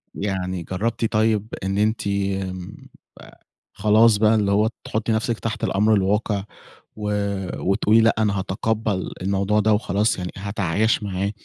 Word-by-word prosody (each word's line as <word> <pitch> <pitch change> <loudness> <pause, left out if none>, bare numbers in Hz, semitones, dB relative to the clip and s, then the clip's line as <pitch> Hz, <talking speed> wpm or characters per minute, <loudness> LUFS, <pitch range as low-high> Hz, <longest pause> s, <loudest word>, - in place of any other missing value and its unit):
يعني 95 -3 -3
جرّبتِ 110 +7 -2
طيب 110 -1 +2 0.2
إن 95 +1 -1
أنتِ 110 0 0
آآ 95 -1 -5 0.3
خلاص 110 +1 +4
بقى 110 +1 +4
اللي 100 -2 +1
هو 105 +2 +3
تحطّي 110 +1 -2
نفسِك 110 +1 -1
تحت 110 -1 -4
الأمر 105 +3 +2
الواقع 100 +1 +1 0.5
و 105 -1 -3 0.5
وتقولي 105 +3 +3
لأ، 115 0 +3
أنا 105 -3 +1
هاتقبّل 105 +1 -2
الموضوع 100 +2 +1
ده 105 +1 +3
وخلاص، 105 +1 +1
يعني 90 -1 -4
هاتعايش 100 +2 0
معاه. 100 0 -2
105 Hz, 135 wpm, -22 LUFS, 95-110 Hz, 0.5 s, خلاص